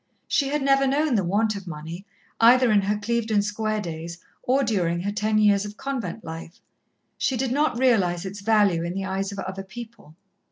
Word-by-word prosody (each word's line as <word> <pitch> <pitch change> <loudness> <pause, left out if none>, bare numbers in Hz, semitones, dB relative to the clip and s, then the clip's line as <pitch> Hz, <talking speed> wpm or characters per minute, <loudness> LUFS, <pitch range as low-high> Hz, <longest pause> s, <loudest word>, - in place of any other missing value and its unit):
She 280 - +1
had 290 0 -1
never 275 0 +3
known 290 +1 +1
the 205 -4 +2
want 210 +4 +1
of 195 -2 -8
money, 165 +5 -7 0.3
either 245 +1 +6
in 205 -1 +4
her 205 +2 0
Clevedon 220 -1 0
Square 215 +1 -2
days 170 -1 -6 0.2
or 270 +2 +2
during 175 -7 0
her 200 +3 -2
ten 215 +1 0
years 205 -2 +4
of 210 0 -8
convent 235 -7 -4
life. 165 +2 -8 0.6
She 260 - 0
did 255 0 -1
not 290 -2 +1
realize 195 -9 +2
its 200 +1 -6
value 205 -5 +3
in 170 +1 -4
the 195 0 -2
eyes 195 +1 -2
of 200 - -8
other 190 0 -5
people. 220 -6 -11
210 Hz, 195 wpm, -24 LUFS, 190-235 Hz, 0.6 s, either